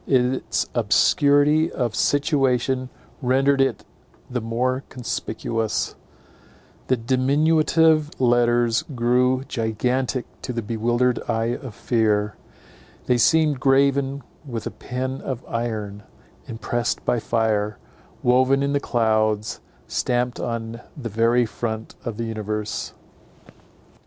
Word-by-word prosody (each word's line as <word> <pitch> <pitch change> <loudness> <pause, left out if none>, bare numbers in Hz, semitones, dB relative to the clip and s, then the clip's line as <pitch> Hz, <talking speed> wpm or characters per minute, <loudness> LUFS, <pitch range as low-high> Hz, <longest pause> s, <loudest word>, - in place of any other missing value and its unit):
Its 130 -1 +1
obscurity 145 +3 +3
of 120 -4 -2
situation 130 -2 +1 0.3
rendered 135 +2 +3
it 135 - 0 0.5
the 125 -1 -1
more 125 +4 -1
conspicuous: 115 -2 -3 0.9
the 130 - +2
diminutive 155 +5 +3
letters 120 -1 +3
grew 125 +2 +2
gigantic 125 +3 -1 0.2
to - - -4
the 115 -2 -3
bewildered 120 +3 +1
eye 115 +1 0
of 125 -7 -9
fear: 110 -2 +1 0.7
they 125 - +3
seemed 150 +1 +3
graven 140 +1 +2 0.2
with 120 -6 -5
a - - -3
pen 130 +1 -4
of 130 -2 -5
iron, 110 -3 -3 0.5
impressed 120 0 -2
by 120 - +1
fire, 110 -2 0 0.5
woven 130 +2 +3
in 140 0 0
the 145 - +2
clouds, 110 -4 0 0.3
stamped 125 0 -1
on 115 0 -4 0.2
the 120 -5 -5
very 115 +3 +3
front 110 0 -4
of 115 -3 -5
the 115 - -2
universe. 105 -1 -4
120 Hz, 105 wpm, -23 LUFS, 115-135 Hz, 0.9 s, obscurity